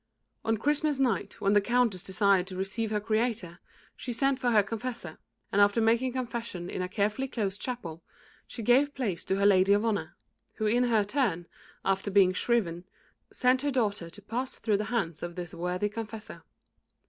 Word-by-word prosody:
On 225 0 +1
Christmas 295 +4 +1
night, 250 -8 0
when 200 0 +3
the 205 - +5
Countess 235 -4 +1
desired 190 -1 +2
to 190 - -6
receive 195 +4 -1
her 210 -1 0
Creator, 215 -5 -1 0.4
she 250 - -5
sent 270 +3 +1
for 250 -2 +1
her 215 -3 +5
confessor, 225 -5 -6 0.3
and 205 - +3
after 205 +3 +4
making 235 +3 +2
confession 230 -8 -4
in - - -3
a 180 - -3
carefully 215 +6 0
closed 205 -6 -3
chapel, 175 -11 -5 0.5
she 230 - -6
gave 270 +6 +3
place 210 -10 -2
to 190 - 0
her 200 +1 +1
lady 195 0 +5
of 205 +2 +2
honour, 215 -3 -1 0.4
who 220 - -2
in 240 +4 +3
her 225 -3 +3
turn, 205 - 0 0.4
after 195 +1 0
being 190 -2 +5
shriven, 180 -5 0 0.5
sent 255 +1 +3
her 290 - 0
daughter 210 -10 0
to 205 +4 -13
pass 250 +5 -3
through 210 -3 0
the 210 - -2
hands 195 -8 -2
of 175 0 -5
this 175 -2 -6
worthy 180 +3 -1
confessor. 220 0 -7
210 Hz, 185 wpm, -29 LUFS, 190-240 Hz, 0.5 s, the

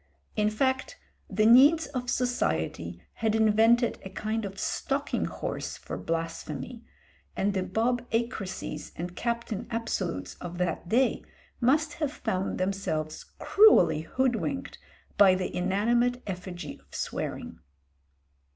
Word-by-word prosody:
In 210 0 +2
fact 260 +5 0 0.3
the 215 - +2
needs 280 +8 +7
of 250 -2 -4
society 85 - -1
had 220 -1 0
invented 225 +2 +4
a 190 - -7
kind 215 +3 -2
of 195 0 -7
stalking 275 +7 -1
horse - - -4
for - - -7
blasphemy, 165 - -4 0.5
and 200 +1 +1
the 190 - 0
Bob 230 +6 0
Acreses 210 -9 -3
and 175 +1 -5
Captain 235 -2 -3
Absolutes 195 - -2
of 175 0 -6
that 175 -1 -2
day 255 +5 +2 0.4
must 295 +5 +2
have 295 -3 +1
found 190 -9 -2
themselves 185 -5 -2
cruelly 420 - +5
hoodwinked 260 - -1 0.4
by 195 -2 +8
the 185 -1 -3
inanimate 235 +7 +1
effigy 180 -2 -6
of - - -16
swearing. 85 - -4
215 Hz, 120 wpm, -28 LUFS, 180-245 Hz, 0.5 s, by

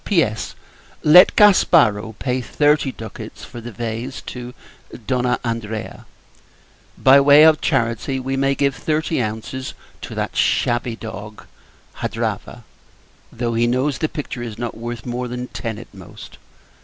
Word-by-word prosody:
P.S. 155 - 0 0.5
Let 180 +5 +8
Gasparo 120 - +4
pay 130 +1 -1
thirty 145 +2 +1
ducats, 110 -2 -9
for 120 -1 -10
the 120 +1 -8
vase, 115 +4 -5
to 125 0 -8 0.4
D. 115 +1 -5 0.3
Andrea. 110 -2 -5 0.9
By 135 +1 +6
way 145 +2 +7
of 155 -1 +5
charity, 130 -1 0
we 135 +1 -3
may 135 +1 +1
give 140 -1 +1
thirty 155 0 -1
ounces 110 +4 -5 0.3
to - - -7
that - - -3
shabby 120 0 +1
dog, 105 -1 -9 0.5
Hadrava; - - -4 0.7
though 115 0 -3
he 115 +1 +2
knows 130 +3 0
the 155 - 0
picture 150 -5 -6
is 115 -3 -6
not 120 -1 -4
worth 115 0 -6
more 125 0 -3
than 125 +1 -6
ten 115 -3 -5
at 115 - -12
most. 95 -3 -12
120 Hz, 140 wpm, -20 LUFS, 115-140 Hz, 0.9 s, Let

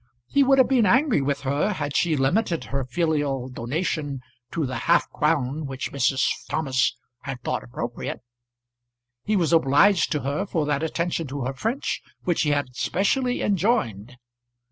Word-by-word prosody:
He 280 - +3
would 270 0 +4
have 260 - +6
been 245 -6 +3
angry 255 - +3
with 140 +1 -1
her 145 +9 0
had 145 -5 -4
she 160 -3 +2
limited 170 +6 +1
her 135 0 -3
filial 145 -2 -1
donation 140 +2 -3 0.3
to 160 -3 -1
the 130 0 -4
half 170 - +4
crown 150 -1 0
which 135 -1 -5
Mrs. 135 -1 +1 0.3
Thomas 130 -5 +1 0.2
had 135 -2 -6
thought - - -2
appropriate. 120 0 -5 1.0
He 215 - +1
was 170 -4 +2
obliged 165 +4 +4
to 150 - -1
her 140 +9 -2
for 160 -5 -1
that 145 -1 0
attention 165 0 -1
to 140 +1 -5
her 130 +2 -2
French 225 - -2 0.2
which 175 -2 +1
he 150 - +1
had 145 -4 -1
specially 245 - 0
enjoined. 165 - 0
150 Hz, 160 wpm, -24 LUFS, 135-185 Hz, 1.0 s, have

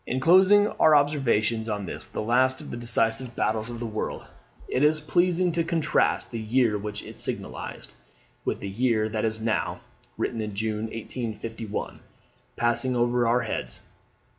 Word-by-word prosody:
In 130 - -1
closing 190 +7 +6
our 155 -1 +6
observations 120 -6 +2
on 105 -2 -2
this - - -6
the - - -4
last 130 +3 +3
of - - -9
the - - -4
Decisive 120 +1 0
Battles 110 +1 0
of 120 -1 -6
the 120 - -4
World, 110 -1 -4 0.4
it 130 - 0
is 155 +1 +4
pleasing 175 +3 +2
to 170 0 0
contrast 165 -2 +1
the 115 - -4
year 115 0 +2
which 105 0 -5
it - - -10
signalized - - -5 0.5
with - - -2
the 100 - -4
year 110 +1 +1
that 110 0 -1
is 110 0 -1
now 110 0 -1 0.4
[Written 115 - -2
in 105 -2 -5
June 110 +1 -2
1851.] 115 -1 -5 0.6
passing 120 +2 +1
over 120 0 +2
our 120 +2 +3
heads. 85 - -4
120 Hz, 165 wpm, -26 LUFS, 110-130 Hz, 0.6 s, closing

